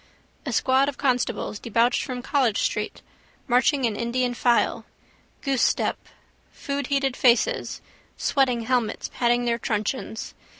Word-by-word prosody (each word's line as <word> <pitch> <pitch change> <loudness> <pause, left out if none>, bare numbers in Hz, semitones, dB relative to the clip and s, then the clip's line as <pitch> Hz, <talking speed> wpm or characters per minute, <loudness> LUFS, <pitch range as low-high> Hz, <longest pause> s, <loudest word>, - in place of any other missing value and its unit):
A - - -1
squad 265 +2 +3
of 280 - -7
constables 250 -5 -1
debouched 235 +2 +1
from 250 -2 -5
College 260 -7 +1
street, 210 0 -2 0.4
marching 255 +2 +3
in 225 -3 0
Indian 245 +2 -1
file. 240 0 +1 0.6
Goosestep. 270 -4 +1 0.6
Foodheated 280 -1 -2
faces, 260 - +2 0.4
sweating 255 -5 +1
helmets, 240 -1 -1
patting 240 0 +1
their 235 0 0
truncheons. 220 +1 -3
250 Hz, 115 wpm, -24 LUFS, 235-270 Hz, 0.6 s, squad